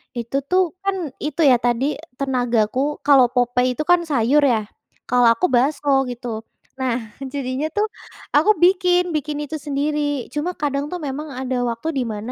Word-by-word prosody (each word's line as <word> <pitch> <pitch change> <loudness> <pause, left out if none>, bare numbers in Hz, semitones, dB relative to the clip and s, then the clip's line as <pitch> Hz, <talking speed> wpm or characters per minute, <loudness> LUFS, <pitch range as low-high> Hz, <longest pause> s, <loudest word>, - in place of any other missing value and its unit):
Itu 235 +2 -5
tuh 370 +1 +4 0.2
kan 395 0 0 0.2
itu 300 +2 -3
ya, 270 -4 +7
tadi 245 +2 0 0.3
tenagaku 245 -4 0 0.3
kalau 275 -4 +6
Popeye 250 +1 +2
itu 305 - -2
kan 355 - +6
sayur 275 0 +3
ya, 220 - +2 0.5
kalau 245 -1 +4
aku 295 - +1
bakso 270 +1 +2
gitu. 245 0 -6 0.5
Nah, 255 -3 0 0.4
jadinya 275 +2 -2
tuh 420 +1 +2 0.5
aku 315 +8 +5
bikin 360 -1 +4
bikin 300 0 -2
itu 310 +2 -5
sendiri. 290 +1 -2 0.3
Cuma 335 +5 -2
kadang 280 -1 -1
tuh 360 - -4
memang 290 +3 -5
ada 260 -1 -2
waktu 230 +6 -5
di - - +1
mana, 210 +4 -6
275 Hz, 160 wpm, -21 LUFS, 245-300 Hz, 0.5 s, ya